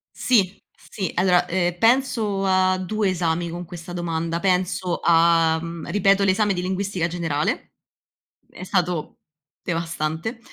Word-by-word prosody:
Sì, 200 -6 +1 0.2
sì. 190 -3 -5
Allora, 180 -1 +3
uhm, 175 -1 0
penso 225 -5 +2
a 185 0 +3
2 205 +2 -1
esami 170 -1 -1
con 175 +1 -6
questa 175 +1 -9
domanda. 170 -1 -2
Penso 180 -1 0
a 165 -1 +4
mhmm, 165 0 -7
ripeto 200 0 +3
l'esame 200 +1 +2
di 180 - -2
linguistica 190 -1 -2
generale, 165 -4 -2 0.8
è - - -10
stato 180 -4 -2 0.4
devastante. 165 +5 -3
180 Hz, 125 wpm, -23 LUFS, 170-195 Hz, 0.8 s, a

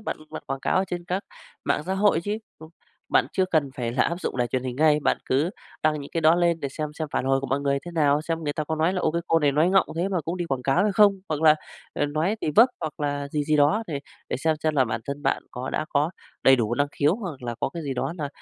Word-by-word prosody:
Bạn 215 - -4
bạn 155 - -7
quảng 135 0 -3
cáo 190 - +1
trên 175 -1 -5
các 185 +3 -2 0.4
mạng - - +1
xã 190 - 0
hội 195 -4 +3
chứ. 205 +4 -3 0.2
Không, 160 0 -11 0.4
bạn - - +3
chưa 190 - +2
cần 145 -4 +2
phải 120 -2 -2
là 125 - +2
áp 170 +2 -1
dụng - - -3
đài 120 -1 +1
truyền 130 +1 -2
hình 125 -1 -4
ngay, 150 0 +4
bạn - - +2
cứ 145 +7 +1 0.3
đăng 155 -1 +2
những 140 - -9
cái 165 - 0
đó 160 +1 +6
lên 170 -2 +2
để 140 - -2
xem 150 +2 -4
xem 155 -2 -3
phản - - 0
hồi 135 0 +2
của 135 - -4
mọi 135 +2 0
người 140 -1 +1
thế 175 - -6
nào, 145 -2 +3
xem 165 0 -2
người 145 - -1
ta 155 - -3
có 160 +1 -2
nói 160 +4 +2
là 185 - -1
"Ô, 160 - +2
cái 170 +1 -2
cô 165 - +4
này 145 -2 +2
nói 155 +5 +3
ngọng 195 - +4
thế 180 +3 0
mà 185 -4 0
cũng 165 +4 -4
đi 175 - -2
quảng 135 -5 -2
cáo" 135 +6 +2
hay 210 -1 +2
không, 205 0 +6 0.2
hoặc 155 0 -2
là, 155 -1 +7 0.4
ờ, 145 - +1
nói 160 +9 0
thì - - -1
vấp 240 +3 +8
hoặc 155 -2 -5
là 145 -1 -2
gì 145 0 -1
gì 155 0 +2
đó 150 +10 +3
để 145 -3 -4 0.3
để - - -1
xem 160 +3 +1
xem 155 -1 +1
là 130 -2 +4
bản 110 0 -3
thân 140 +1 -5
bạn - - 0
có 125 +1 -5
đã 155 - -1
có 150 +4 +1 0.3
đầy 135 0 +7
đủ 115 0 0
năng 145 +2 +1
khiếu 150 +4 +2
hoặc 175 - -6
là 120 -1 -3
có - - +1
cái 165 - -4
gì 135 -2 -3
đó 145 - -2
là 145 - -2
155 Hz, 300 wpm, -25 LUFS, 140-170 Hz, 0.4 s, vấp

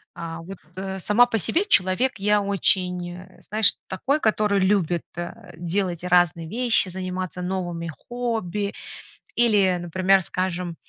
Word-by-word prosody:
А, 165 0 -6
вот, 190 +2 -9 0.2
э, 190 0 -5
сама 210 +6 +4
по 225 - 0
себе 330 - +3
человек 195 - +2
я 210 +1 +3
очень, 180 -3 0
э, 185 +1 -14
знаешь, 215 -1 +3
такой, 275 +11 0
который 210 -3 +2
любит, 185 -4 +1
а, 175 +5 -7
делать 175 0 -2
разные 175 -2 +2
вещи, 230 -2 +1
заниматься 185 -1 -4
новыми 175 -2 -3 0.2
хобби 220 -5 -2 0.6
или, 205 -6 +3
например, 185 +3 +2
скажем, 180 -1 -2
185 Hz, 130 wpm, -24 LUFS, 175-210 Hz, 0.6 s, сама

